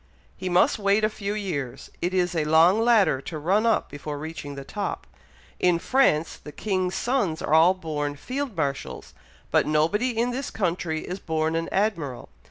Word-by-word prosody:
"He 185 - -4
must 180 +4 +3
wait 200 +1 +2
a 215 - +3
few 205 -1 -4
years. 155 - -4
It 175 - 0
is 180 -1 +1
a 160 -3 0
long 165 +6 +5
ladder 220 - +4
to 155 - -6
run 195 +9 +2
up 225 - +2
before 145 +1 -6
reaching 150 -1 -7
the 140 - -7
top. 205 +8 -4 0.5
In 180 -1 +3
France, 170 - +2
the 150 - -11
king's 185 0 -1
sons 235 -11 0
are - - -2
all 165 +4 +6
born 150 -5 -3
Field 255 - -4
Marshals, 140 -3 -3 0.4
but - - +3
nobody 205 +11 +1
in 240 +2 +1
this 260 +2 -3
country 170 -5 -2
is 185 +2 -6
born 160 -1 -1
an 165 0 -2
Admiral. 170 - -1
180 Hz, 175 wpm, -25 LUFS, 155-210 Hz, 0.5 s, all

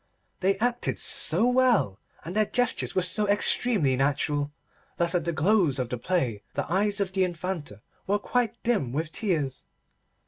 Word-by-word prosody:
They 195 +1 +1
acted 245 +3 0
so 180 +9 +3
well, 245 - +2 0.3
and 175 +4 -6
their 215 -1 +2
gestures 245 -1 0
were 185 - +2
so 210 +3 +1
extremely 205 - +2
natural, 145 +2 0 0.5
that 170 -1 0
at 175 -3 0
the 170 - 0
close 170 -2 +2
of 125 -2 -2
the 125 - -3
play 125 - -1
the - - -1
eyes 205 +2 +1
of 195 -2 -1
the 190 -1 +2
Infanta 170 - -4 0.2
were 200 +2 +2
quite 235 +2 -2
dim 205 - 0
with 155 +2 -2
tears. 150 - -2
180 Hz, 165 wpm, -26 LUFS, 145-210 Hz, 0.5 s, so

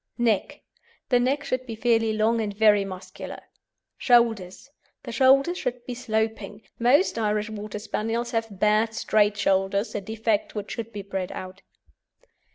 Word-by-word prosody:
NECK 230 -5 0 0.5
The 245 -2 +4
neck 270 +4 0
should 255 -1 -3
be 225 - -5
fairly 225 -1 +2
long 220 +1 +1
and 205 -2 -4
very 210 -2 +5
muscular. 185 -1 -8 0.6
SHOULDERS 235 -1 +2 0.3
The - - -6
shoulders 275 +6 +4
should 245 -1 -4
be 250 - -5
sloping. 220 -3 -3 0.2
Most 245 +3 +3
Irish 210 0 -1
Water 210 0 -6
Spaniels 225 +3 -3
have 225 -1 -1
bad, 215 +2 +2
straight 210 -1 +2
shoulders, 195 +2 +1
a 205 - -3
defect 220 +1 -1
which 205 -1 -5
should 230 -1 -5
be 205 -2 -6
bred 190 -2 -4
out. 185 +1 -8
220 Hz, 150 wpm, -25 LUFS, 205-235 Hz, 0.6 s, very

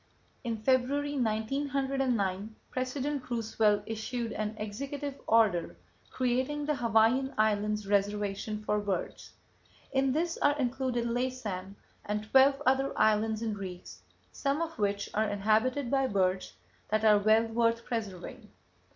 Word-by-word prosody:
In 230 -2 -2
February, 265 +5 +1
1909, 245 -3 -1 0.2
President 260 +2 -3
Roosevelt 220 -3 +1
issued 225 +1 -3
an 215 0 -3
executive 275 +7 -5
order 215 -7 +3 0.3
creating 260 +4 -1
the 300 - +1
Hawaiian 240 +3 +2
Islands 210 -1 +1
Reservation 205 +1 -1
for 210 0 +1
Birds. 205 -2 -4 0.6
In 270 -1 +2
this 330 +4 -1
are 290 0 +3
included 255 -2 -1
Laysan 235 -6 -3 0.3
and 210 0 -2
twelve 275 +1 +6
other 265 +1 +2
islands 220 +1 +2
and 220 -2 -1
reefs, 185 -3 -8 0.3
some 280 +1 -1
of 330 -4 -4
which 200 -1 0
are 215 0 +1
inhabited 220 +6 +1
by 270 -1 +2
birds 185 - 0 0.4
that 215 +1 +1
are 210 -1 +6
well 215 +2 +4
worth 230 0 +1
preserving. 205 -7 -5
225 Hz, 125 wpm, -30 LUFS, 210-265 Hz, 0.6 s, twelve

